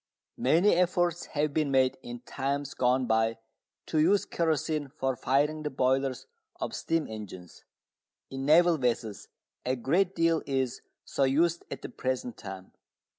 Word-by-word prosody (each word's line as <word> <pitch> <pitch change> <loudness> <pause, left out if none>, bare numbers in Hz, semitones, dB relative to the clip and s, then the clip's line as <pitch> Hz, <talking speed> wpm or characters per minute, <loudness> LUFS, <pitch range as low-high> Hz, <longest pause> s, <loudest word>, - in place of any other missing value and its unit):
Many 165 +10 +4
efforts 175 -1 +1
have 150 0 +1
been 155 -2 +1
made 130 -1 +3
in 120 0 -8
times 140 +2 -3
gone 125 +1 +2
by 110 0 +1 0.5
to 155 - 0
use 190 +6 +4
kerosene 155 -2 -1
for 135 -2 -2
firing 145 +5 +1
the 150 - -2
boilers 130 -1 0 0.3
of - - -3
steam 165 -1 -1
engines. 95 -5 -9 0.7
In 135 0 -4
naval 165 +3 +5
vessels 115 -4 -2 0.4
a 130 +1 0
great 175 +10 +1
deal 165 -1 +2
is 130 -3 -1 0.2
so 140 - -1
used 165 +6 +2
at - - -7
the - - -5
present 130 -2 -3
time. 95 -2 -9
135 Hz, 145 wpm, -29 LUFS, 125-160 Hz, 0.7 s, naval